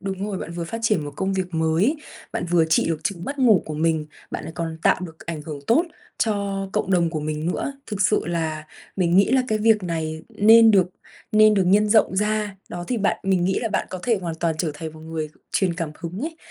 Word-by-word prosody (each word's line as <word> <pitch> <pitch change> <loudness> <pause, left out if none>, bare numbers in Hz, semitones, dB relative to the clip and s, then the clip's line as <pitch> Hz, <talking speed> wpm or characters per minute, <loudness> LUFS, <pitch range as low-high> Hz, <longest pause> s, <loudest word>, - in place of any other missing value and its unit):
đúng 195 0 -4
rồi, 200 -3 -3
bạn - - -6
vừa 170 0 -4
phát 200 +7 -5
triển 210 -9 +1
một 145 - -5
công 190 0 -1
việc 185 -2 -3
mới, 160 - +2 0.4
bạn - - -2
vừa 170 -2 +4
trị 160 0 +2
được 165 -2 -1
chứng 175 -4 -2
mất 280 +5 -5
ngủ 230 -8 +5
của 155 - -5
mình, 160 0 0 0.2
bạn - - -5
lại - - -7
còn 165 -1 -4
tạo - - +3
được 165 -3 -8
ảnh 165 -3 -4
hưởng 150 -1 -6
tốt 315 +9 +4 0.3
cho 200 -3 -1
cộng 195 - -1
đồng 170 -3 +3
của 155 -2 -3
mình 155 +1 -3
nữa. 280 - -3
Thực 205 -2 -5
sự 210 +1 +3
là 160 -2 -2 0.3
mình 175 -2 +2
nghĩ 200 +3 +5
là 260 -1 +4
cái 215 - +1
việc 215 -1 +3
này 160 -2 -3
nên 225 +2 +6
được 190 -4 +4 0.5
nên 215 0 +6
được 195 -2 +2
nhân 205 +3 +4
rộng 210 -3 +3
ra. 210 -1 0
Đó, 175 0 -6
thì 250 - 0
bạn 205 -2 +1
mình 190 -2 +1
nghĩ 190 - +1
là 225 - -1
bạn 205 - -1
có 185 - -5
thể 230 -4 +1
hoàn 170 -2 -3
toàn 165 0 -1
trở 160 -1 0
thành 160 +1 -6
một 155 - -13
người 160 -1 -4 0.2
truyền 185 -3 +1
cảm 165 -3 -3
hứng 175 +3 -5
ấy, 320 +4 -4
185 Hz, 245 wpm, -23 LUFS, 165-210 Hz, 0.5 s, nên